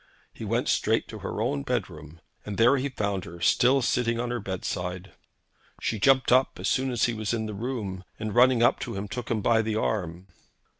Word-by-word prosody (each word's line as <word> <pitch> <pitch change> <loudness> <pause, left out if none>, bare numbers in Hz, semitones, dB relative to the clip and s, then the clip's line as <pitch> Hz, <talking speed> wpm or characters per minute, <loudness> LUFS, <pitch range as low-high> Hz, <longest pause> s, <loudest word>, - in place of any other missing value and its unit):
He - - -9
went - - -1
straight - - +1
to - - -8
her - - -5
own 70 - -1
bedroom, 75 +3 -4 0.2
and 105 -1 -6
there 120 +4 +5
he 135 +2 -1
found 100 -7 -2
her 85 0 -10
still 125 - +3
sitting 115 -1 +1
on 120 0 -2
her 120 - -2
bedside. 90 -1 -4 0.7
She 110 - -2
jumped 130 +3 +4
up 130 +2 +3
as - - -2
soon 130 0 +1
as 120 -3 -1
he 120 - +2
was 110 +1 -2
in 110 -1 -2
the 105 - -5
room, 105 -4 -4
and 110 -1 -4
running 125 0 +5
up 120 - +4
to - - -5
him, 100 +1 -4
took 120 +3 -6
him 110 -3 -1
by 115 -1 +4
the 110 -1 -2
arm. 90 -5 -2
110 Hz, 210 wpm, -26 LUFS, 95-120 Hz, 0.7 s, there